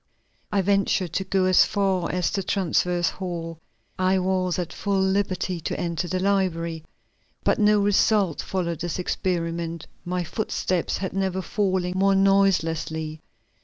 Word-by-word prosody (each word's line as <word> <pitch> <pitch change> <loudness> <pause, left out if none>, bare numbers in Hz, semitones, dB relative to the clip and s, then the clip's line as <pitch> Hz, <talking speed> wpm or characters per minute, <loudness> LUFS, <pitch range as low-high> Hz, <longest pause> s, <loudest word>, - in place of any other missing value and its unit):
I 200 -2 +2
ventured 195 -3 +1
to 190 - 0
go 190 0 +1
as 185 -1 +6
far 190 -4 0
as 180 -1 0
the 195 - -1
transverse 180 -2 +1
hall, 170 -3 -5 0.4
I 185 +1 +3
was 185 -1 0
at 180 -3 -3
full 200 -1 -1
liberty 190 -2 0
to - - -3
enter 170 +1 -2
the 185 +1 -1
library. 175 -4 0 0.6
But - - +2
no 210 0 +4
result 200 -3 +2
followed 170 -4 -2
this 175 -1 -3
experiment; 170 -2 -2 0.2
my 180 0 -2
footsteps 180 -1 -1
had 190 - -4
never 190 -1 -1
fallen 185 -3 0
more 195 +1 +3
noiselessly. 165 -5 +1
185 Hz, 140 wpm, -24 LUFS, 170-195 Hz, 0.6 s, as